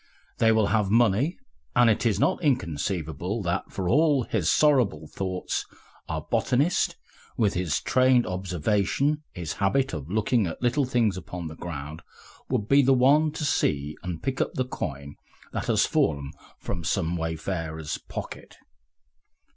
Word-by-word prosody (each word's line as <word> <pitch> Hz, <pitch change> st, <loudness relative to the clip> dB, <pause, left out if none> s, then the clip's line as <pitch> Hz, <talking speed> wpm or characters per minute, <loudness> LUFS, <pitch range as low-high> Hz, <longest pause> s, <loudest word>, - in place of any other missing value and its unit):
They 115 Hz, -1 st, +5 dB
will 110 Hz, -1 st, +3 dB
have 105 Hz, -3 st, +2 dB
money, 120 Hz, -, +3 dB, 0.4 s
and 120 Hz, -1 st, +6 dB
it 115 Hz, +1 st, +2 dB
is 110 Hz, -, +1 dB
not -, -, +2 dB
inconceivable 90 Hz, -, -1 dB
that, 90 Hz, +2 st, -2 dB
for 95 Hz, -2 st, -3 dB
all 145 Hz, -, +3 dB
his 100 Hz, -8 st, 0 dB
sorrowful 125 Hz, -, +3 dB
thoughts, 95 Hz, +3 st, -3 dB, 0.5 s
our -, -, -3 dB
botanist, 145 Hz, +8 st, +1 dB, 0.4 s
with 105 Hz, -4 st, +2 dB
his 90 Hz, -5 st, 0 dB
trained 130 Hz, -1 st, +3 dB
observation, 95 Hz, -, 0 dB
his 85 Hz, -4 st, -5 dB
habit 135 Hz, +7 st, +2 dB
of 75 Hz, 0 st, -5 dB
looking 110 Hz, +1 st, +1 dB
at 80 Hz, -, -6 dB
little 125 Hz, +3 st, +1 dB
things 115 Hz, -6 st, +1 dB
upon 85 Hz, -1 st, -6 dB
the 80 Hz, -, -9 dB
ground, 75 Hz, -2 st, -7 dB, 0.5 s
would 115 Hz, -5 st, -1 dB
be 140 Hz, +3 st, +6 dB
the 135 Hz, 0 st, +4 dB
one 145 Hz, +5 st, +4 dB
to 155 Hz, -1 st, -3 dB
see 75 Hz, -, 0 dB
and 85 Hz, -4 st, -6 dB
pick 135 Hz, 0 st, -1 dB
up -, -, -2 dB
the 130 Hz, -, 0 dB
coin 70 Hz, -, -6 dB, 0.4 s
that -, -, -3 dB
has -, -, +3 dB
fallen 70 Hz, -2 st, 0 dB, 0.3 s
from 85 Hz, -4 st, -5 dB
some 80 Hz, +1 st, 0 dB
wayfarer's 80 Hz, -1 st, -3 dB
pocket. -, -, -8 dB
100 Hz, 150 wpm, -26 LUFS, 80-125 Hz, 0.5 s, and